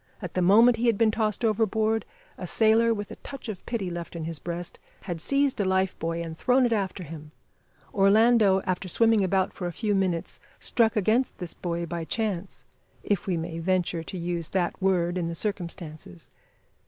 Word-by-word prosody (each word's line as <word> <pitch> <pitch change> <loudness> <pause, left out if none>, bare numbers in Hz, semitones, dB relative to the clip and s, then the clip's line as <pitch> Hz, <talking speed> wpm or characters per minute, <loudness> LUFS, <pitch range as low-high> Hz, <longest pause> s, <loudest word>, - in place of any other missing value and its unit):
At - - -7
the 185 - 0
moment 225 +6 +6
he 240 +2 0
had 230 -3 +3
been 225 0 +4
tossed 215 0 -1
overboard, 220 0 +1 0.3
a 180 - -7
sailor, 225 +4 +4
with 205 -2 -3
a - - -8
touch 275 -3 -9
of 210 -5 -6
pity 200 -7 -2
left 170 0 -6
in 165 - -4
his 160 -1 -5
breast 175 0 -5 0.2
had 175 -4 -4
seized 275 +1 +3
a - - +2
life 190 0 +1
buoy 165 +1 -2
and 165 -1 -6
thrown 250 +8 +3
it 235 - +2
after 195 -3 -2
him. 155 -1 -9 0.6
Orlando, 205 0 +4
after 185 0 -2
swimming 225 +2 +3
about 190 0 +1
for 180 - -4
a - - -3
few 210 +4 -1
minutes, 185 -4 -1 0.2
struck 225 -3 +1
against 220 +5 +1
this 175 -3 -6
buoy 170 -1 -3
by 170 0 -4
chance 195 +1 -3 0.4
if 200 -3 -1
we 180 -3 0
may 165 0 -4
venture 180 -1 0
to 175 +3 -7
use 170 -1 -3
that 185 0 -1
word 180 -2 +1
in 170 - -1
the 170 - -4
circumstances. 170 - -5
190 Hz, 190 wpm, -26 LUFS, 170-220 Hz, 0.6 s, moment